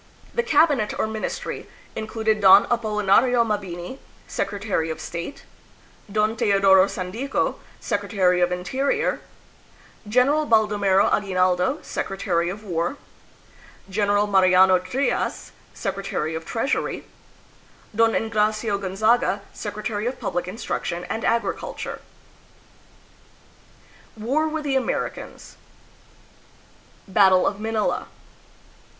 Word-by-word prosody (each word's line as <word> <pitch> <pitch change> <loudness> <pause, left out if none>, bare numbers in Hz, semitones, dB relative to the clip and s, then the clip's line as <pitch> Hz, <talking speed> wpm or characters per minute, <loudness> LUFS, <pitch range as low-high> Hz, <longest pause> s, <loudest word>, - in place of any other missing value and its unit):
The 475 - +1
cabinet, 295 - +2
or - - +1
ministry, 220 0 -5 0.3
included 220 -1 -1
Don 195 +1 +8
Apolinario 230 +1 +3
Mabini, 200 +2 -4 0.3
secretary 200 -5 -2
of 160 - -4
state; 170 +10 -6 0.7
Don 215 +1 +1
Teodoro 195 -3 +4
Sandico, 200 +10 -2 0.2
secretary 200 -4 +1
of 175 0 +2
interior; 260 +11 -1 0.9
General 280 +7 +3
Baldo 215 -2 +3
mero 195 -1 +4
Aguinaldo, 185 +4 +1
secretary 175 -3 -2
of 205 +4 -7
war; 175 - -2 0.9
General 205 +1 +2
Mariano 185 -2 +5
Trias, 245 +10 -2 0.2
secretary 195 -6 -3
of 160 0 -5
treasury; 240 +4 -2 0.9
Don 225 0 +4
Engracio 215 -1 0
Gonzaga, 200 +1 +1
secretary 210 +1 -4
of 255 - -4
public 175 0 -3
instruction 185 -4 -4
and 225 - -3
agriculture. 230 0 -2 2.2
War 270 +9 0
with 315 0 -3
the 280 -2 -1
Americans. 265 - -3 1.5
Battle 190 -2 +5
of 200 - -1
Manila. 220 0 -1
210 Hz, 95 wpm, -23 LUFS, 190-230 Hz, 2.2 s, Don